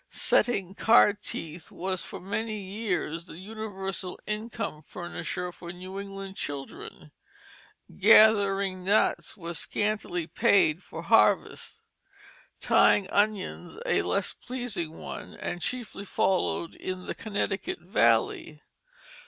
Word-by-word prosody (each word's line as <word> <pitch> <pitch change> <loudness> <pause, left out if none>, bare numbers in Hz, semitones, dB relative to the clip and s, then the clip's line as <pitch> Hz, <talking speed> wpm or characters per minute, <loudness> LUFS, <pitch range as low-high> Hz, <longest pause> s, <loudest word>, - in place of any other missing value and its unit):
Setting 195 -6 +2
card 210 -1 +5
teeth 165 -2 -6
was 185 0 -3
for - - -8
many 215 +3 -3
years 190 -5 -3
the 170 - -11
universal 195 -2 -5
income 215 -6 -4
furnisher 175 +2 -5
for 175 0 -9
New 185 +2 -7
England 195 -1 -7
children. 140 -1 -7 0.8
Gathering 200 -3 +5
nuts 205 +2 +2
was 170 -3 -4
a - - 0
scantily 205 -5 -1
paid 195 -5 +3
for - - -8
harvest; - - +2 0.8
tying 200 -2 +4
onions 205 -4 0
a 475 - +2
less - - 0
pleasing 215 -11 -4
one, - - -8
and 175 - -5
chiefly 235 -4 -3
followed 185 -3 0
in 185 -1 -6
the - - -3
Connecticut 205 -2 -2
Valley. 150 - +1
195 Hz, 110 wpm, -28 LUFS, 175-210 Hz, 0.8 s, card